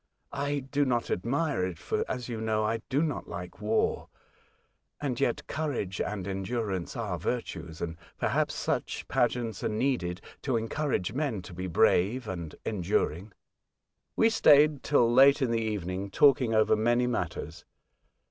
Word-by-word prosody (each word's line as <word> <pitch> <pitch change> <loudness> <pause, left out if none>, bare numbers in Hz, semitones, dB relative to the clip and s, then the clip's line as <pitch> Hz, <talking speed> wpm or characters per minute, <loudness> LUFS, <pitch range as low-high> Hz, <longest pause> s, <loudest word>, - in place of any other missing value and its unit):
I 145 0 -1
do 140 +2 0
not 120 -4 0
admire 135 - 0
it, 90 -3 -3
for, - - -1
as 125 -2 -3
you 115 -3 -4
know, 110 -1 0
I 115 +1 -1
do 140 +3 +2
not 155 -3 -3
like 90 +3 -7
war. 110 +1 0 0.9
And 130 -5 -2
yet 120 - 0
courage 130 -12 -3
and 100 -3 -3
endurance 95 -1 -3
are 100 -7 -3
virtues, 85 -6 -4
and, 85 -1 -4 0.2
perhaps, - - 0
such - - -2
pageants 120 -3 0
are - - +1
needed 105 -6 -1 0.2
to 130 -4 0
encourage 115 - -1
men 130 -9 -2
to 90 - -10
be 90 +2 -4
brave 105 +7 +2
and 85 -5 -5
enduring." 95 -1 -1 0.8
We 225 0 +4
stayed 150 -8 +5
till 135 -5 +3
late 135 +3 +7
in 130 -4 +1
the 115 -1 +1
evening 100 -3 -3
talking 130 0 +4
over 110 -1 +4
many 120 +3 +2
matters. 95 -9 -3
115 Hz, 150 wpm, -29 LUFS, 95-135 Hz, 0.9 s, late